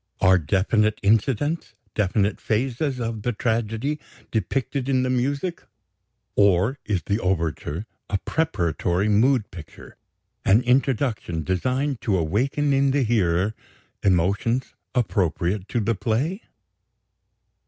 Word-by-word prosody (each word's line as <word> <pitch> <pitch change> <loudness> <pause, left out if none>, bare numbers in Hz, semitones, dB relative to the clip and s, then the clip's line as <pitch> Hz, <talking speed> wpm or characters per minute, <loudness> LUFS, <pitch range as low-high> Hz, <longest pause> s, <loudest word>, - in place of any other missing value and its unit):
Are 95 0 +5
definite 105 +6 +1
incidents, 125 +9 +1 0.2
definite 105 0 0
phases, 130 +4 -1
of 115 -2 -3
the 120 +3 -1
tragedy, 115 +6 -1 0.3
depicted 135 +4 -1
in 130 -1 +2
the 130 - 0
music? 140 +7 -1 0.7
Or 100 +7 +3
is 95 -5 -1
the 100 +2 0
overture 85 -1 -2 0.2
a 100 - +1
preparatory 95 - 0
mood 115 +2 +3
picture, 80 -4 -12 0.5
an 105 +6 +4
introduction 125 - +1
designed 130 - -1
to 100 -4 +1
awaken 130 - +1
in 135 0 +3
the 135 0 +2
hearer 100 -3 +1 0.5
emotions 100 +7 +1 0.2
appropriate 95 -4 0
to 120 - 0
the 115 +1 +1
play? 130 - -1
110 Hz, 110 wpm, -24 LUFS, 95-130 Hz, 0.7 s, Are